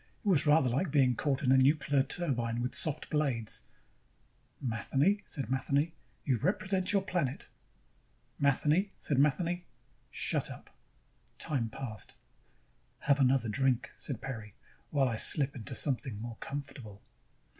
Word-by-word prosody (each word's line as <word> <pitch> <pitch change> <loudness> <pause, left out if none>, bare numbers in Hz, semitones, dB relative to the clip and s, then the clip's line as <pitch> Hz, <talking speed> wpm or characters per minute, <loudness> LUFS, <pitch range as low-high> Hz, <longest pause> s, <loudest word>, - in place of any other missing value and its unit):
It - - -3
was 160 -6 +4
rather 150 -2 +5
like 135 +9 0
being 135 -4 +3
caught 140 +3 0
in 130 - +3
a 130 - +6
nuclear 145 0 +3
turbine 130 -6 -1
with 125 +1 -2
soft 155 -1 -2
blades. 135 -8 0 1.0
Matheny, 135 - +1
said 135 -6 -4
Matheny, 140 +4 +1 0.3
you 130 -5 +1
represent 190 - +1
your 200 -2 +2
planet. 170 -9 -2 0.9
Matheny, 150 +7 +3
said 140 -3 -1
Matheny, 170 +5 +1 0.4
shut - - -1
up. - - -11 0.7
Time 125 -7 -1
passed. 110 -4 -7 0.9
"Have 140 0 +3
another 130 -2 +3
drink," 130 +2 +1
said 135 - -5
Peri, 110 -7 -6 0.3
"while 140 -2 +2
I 115 -3 -1
slip 140 +3 +2
into 115 -5 -6
something 130 -6 -1
more 115 0 -6
comfortable." 135 -7 -7
140 Hz, 135 wpm, -31 LUFS, 125-150 Hz, 1.0 s, a